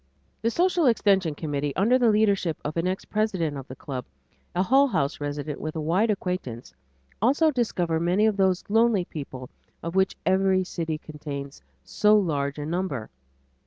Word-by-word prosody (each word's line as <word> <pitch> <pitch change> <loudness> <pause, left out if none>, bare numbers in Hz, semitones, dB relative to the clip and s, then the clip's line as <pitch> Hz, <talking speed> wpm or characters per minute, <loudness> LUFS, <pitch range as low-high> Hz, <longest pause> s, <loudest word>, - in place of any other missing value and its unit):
This 230 +1 0
social 355 -3 +3
extension 195 -8 +3
committee 145 -2 -3
under 235 +7 +3
the 240 -2 +4
leadership 200 -6 +2
of 150 - -3
an 170 +1 0
ex 185 +1 -2
president 190 -8 -1
of 135 -2 -7
the 130 - -8
Club, 130 -1 -6 0.5
a 180 - +2
Hull 270 +7 +4
House 150 - -1
resident 145 0 -4
with 155 +1 -4
a - - -2
wide 175 +9 +1
acquaintance, 180 - -3 0.5
also 285 +8 +4
discover 180 - 0
many 180 +5 +2
of 220 -2 +2
those 190 -2 +2
lonely 225 -3 +3
people 130 -5 -8 0.3
of 170 - -4
which 190 0 +1
every 190 0 +3
city 165 -3 -3
contains 145 -2 -8 0.2
so 210 0 +3
large 145 -7 -1
a 145 - -4
number. 165 - -3
180 Hz, 165 wpm, -25 LUFS, 150-210 Hz, 0.5 s, the